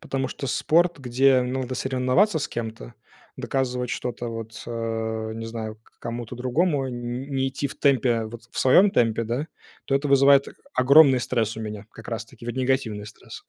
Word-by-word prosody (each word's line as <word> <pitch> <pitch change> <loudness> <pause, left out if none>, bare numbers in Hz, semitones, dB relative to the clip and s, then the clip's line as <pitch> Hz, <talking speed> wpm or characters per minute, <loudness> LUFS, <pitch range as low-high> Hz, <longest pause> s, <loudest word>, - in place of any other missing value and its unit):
потому 135 -1 -3
что 135 - -6
спорт, 170 +5 +2
где 130 0 +3
надо 130 0 -3
соревноваться 130 +10 +2
с 150 - -3
кем-то, 110 - -6 0.4
доказывать 125 -2 -2
что-то 120 -1 -4
вот, 115 0 -7
а, 110 -1 -3
не 115 0 -6
знаю, 110 -1 -5
к - - -29
кому-то 120 0 -5
другому, 135 +3 0
н 120 +2 -5
не 135 0 +1
идти 135 +2 -3
в - - -10
темпе, 125 -5 +2
вот, 115 +1 -9
в - - -7
своем 180 +10 +6
темпе, 115 - +2
да, 120 +7 -2 0.4
то 135 - -1
это 140 +1 0
вызывает, 140 0 +5
э, - - -12 0.2
огромный 135 0 +6
стресс 115 -3 -1
у - - -5
меня, 105 -1 -6
как 115 - -12
раз-таки 115 0 -7
негативный 125 -4 -1
стресс. 105 - -12
125 Hz, 175 wpm, -24 LUFS, 115-135 Hz, 0.4 s, своем